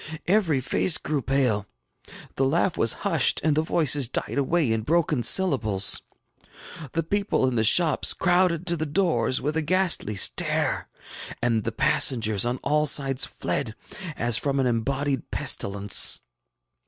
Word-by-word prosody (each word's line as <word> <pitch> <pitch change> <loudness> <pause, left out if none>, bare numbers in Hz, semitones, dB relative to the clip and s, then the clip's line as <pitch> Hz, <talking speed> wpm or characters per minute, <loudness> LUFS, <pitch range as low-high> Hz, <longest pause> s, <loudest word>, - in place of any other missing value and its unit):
Every 175 -8 +1
face 160 +6 0
grew 145 -1 -3
pale; 120 -6 -1 0.7
the 135 - -1
laugh 165 +6 0
was 115 - +3
hushed, - - +2
and 155 -1 +1
the 155 - +1
voices 150 -5 +2
died 135 - -3
away 145 -2 0
in 110 0 -1
broken 155 +1 0
syllables; 110 - +2 0.9
the 165 - -1
people 200 -3 -1
in 130 - -2
the 110 - +1
shops 155 +6 +3
crowded 175 -2 +1
to 170 -1 0
the 160 -1 -4
doors 145 -7 0
with 150 +2 -3
a 160 - 0
ghastly 175 - 0
stare, 95 - 0 0.5
and 115 -3 -1
the - - -2
passengers 110 -4 +2
oil 125 +1 -2
all 150 +1 0
sides 135 -2 +2
fled 115 -6 -3 0.4
as 120 -1 +1
from 140 -1 -2
an 135 - 0
embodied 135 +3 -2
pestilence. 100 0 +2
140 Hz, 145 wpm, -24 LUFS, 120-165 Hz, 0.9 s, was